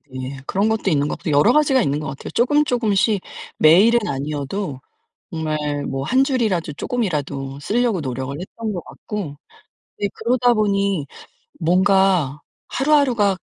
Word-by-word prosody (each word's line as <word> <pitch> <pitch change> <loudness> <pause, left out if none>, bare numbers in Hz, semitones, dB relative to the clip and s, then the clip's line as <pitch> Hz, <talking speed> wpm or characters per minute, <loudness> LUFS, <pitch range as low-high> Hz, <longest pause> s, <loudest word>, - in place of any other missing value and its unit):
예. 130 +1 -5
그런 200 +3 +1
것도 220 -3 0
있는 145 -4 +1
것 - - -4
여러 150 +10 +4
가지가 280 -4 +3
있는 145 -6 0
것 155 - -5
같아요. 135 - -7
쪼금, 290 +5 +3
쪼금씩 220 -5 +1 0.4
매일은 200 +10 +6
아니어도 145 +3 -3 0.5
정말 150 -3 -2
뭐 135 0 -3
1 260 - +3
줄이라도 215 - 0
쪼끔이라도 145 - -3
쓸려고 230 +2 0
노력을 130 0 -4
했던 215 +5 -5
것 175 - -5
같고 190 -10 -6 0.6
네 205 - +1
그러다 245 0 +2
보니 200 -6 0 0.5
뭔가 185 -4 +2 0.3
하루하루가 255 -9 +2
190 Hz, 300 characters per minute, -21 LUFS, 145-230 Hz, 0.6 s, 매일은